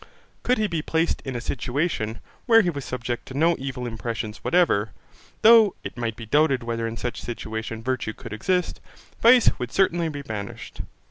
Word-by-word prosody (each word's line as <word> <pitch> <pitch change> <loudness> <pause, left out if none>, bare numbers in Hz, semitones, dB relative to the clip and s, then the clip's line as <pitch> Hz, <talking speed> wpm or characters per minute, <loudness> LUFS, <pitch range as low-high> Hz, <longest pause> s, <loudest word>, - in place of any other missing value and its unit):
Could 250 0 +2
he 215 - +1
be 170 -6 -1
placed 165 +2 0
in 135 -2 -5
a - - -1
situation, 120 -2 -2 0.3
where 225 -1 +7
he 175 - +1
was 140 -3 -6
subject 120 -1 -4
to 130 - -8
no 165 +3 +4
evil 130 -2 -4
impressions 115 -1 -5
whatever, 110 - +2 0.5
though 220 -3 +7
it - - -6
might 115 -2 -3
be 115 - -8
doubted 140 +1 +2
whether 115 -1 -2
in 115 0 -6
such 120 - -4
a - - -10
situation 110 -1 -5
virtue 130 -3 -2
could - - -9
exist, 180 - -1 0.4
vice 240 +1 +7
would 125 -1 -4
certainly 175 -3 +2
be 145 -2 -6
banished. 105 -5 -6
130 Hz, 185 wpm, -24 LUFS, 115-170 Hz, 0.5 s, where